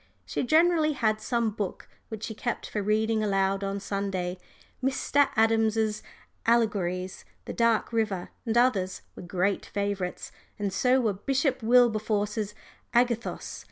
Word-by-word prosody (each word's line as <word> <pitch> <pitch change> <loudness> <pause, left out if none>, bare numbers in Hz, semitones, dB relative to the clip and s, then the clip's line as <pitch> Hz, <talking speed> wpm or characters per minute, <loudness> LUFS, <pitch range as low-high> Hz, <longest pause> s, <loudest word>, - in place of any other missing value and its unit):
She - - -2
generally 315 +2 +3
had 215 -5 0
some 235 -3 0
book 205 -2 -5 0.2
which 220 -2 -7
she 220 - -4
kept 240 +2 -3
for 210 - -3
reading 215 +2 +1
aloud 195 -1 +1
on 195 0 -2
Sunday 190 -2 -3 0.4
Dr. 275 +2 +2
Adams's 220 -1 +2 0.5
Allegories, 195 -6 +1 0.2
"The - - -5
Dark 230 0 +1
River" 210 -5 -1
and 230 -1 0
others, 205 -7 +2
were - - -9
great 185 +2 -1
favourites, 200 -3 -3 0.3
and 200 -2 -2
so 255 +6 +3
were 220 -4 +1
Bishop 265 +6 0
Wilberforce's 215 -3 +2 0.4
Agathos. 240 -1 0
215 Hz, 130 wpm, -27 LUFS, 200-235 Hz, 0.5 s, generally